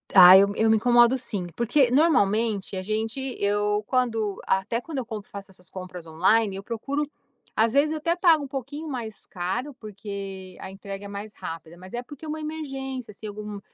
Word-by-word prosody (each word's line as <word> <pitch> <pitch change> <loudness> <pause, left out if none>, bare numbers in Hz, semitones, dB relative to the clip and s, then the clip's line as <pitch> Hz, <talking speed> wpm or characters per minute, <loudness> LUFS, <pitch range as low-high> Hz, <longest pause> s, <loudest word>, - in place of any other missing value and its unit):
Ah, 185 0 +11
eu 200 +1 +5
eu 220 +1 +3
me 220 - +5
incomodo 240 +2 +5
sim, 200 -7 -3
porque, 245 +2 +3
normalmente, 225 - +2
a 185 - -2
gente 220 +5 -2 0.2
eu 205 +1 +1
quando 225 -5 0
até 195 +5 +1
quando 315 +1 -7
eu 260 - -2
compro, 215 -3 -7
faço 200 -1 -9
essas 180 -1 -13
compras 180 -2 -8
online, 190 +6 +2
eu 195 - -6
procuro 275 +7 -2 0.5
às 225 +1 +3
vezes 300 +3 +3
até 335 +2 0
pago 335 -5 +4
um - - -5
pouquinho 280 +4 -6
mais 235 -6 -6
caro, 190 +10 -3
porque 200 -3 -7
a 190 - -7
entrega 195 +1 -8
é - - -6
mais 200 +1 -7
rápida, 165 +1 -8
mas 185 +1 -12
é 240 - -2
porque 290 +5 -11
é - - -7
uma 310 +1 -3
emergência. 270 -6 -5
Se 215 +2 -8
algum, 210 0 -6
220 Hz, 190 wpm, -25 LUFS, 195-265 Hz, 0.5 s, Ah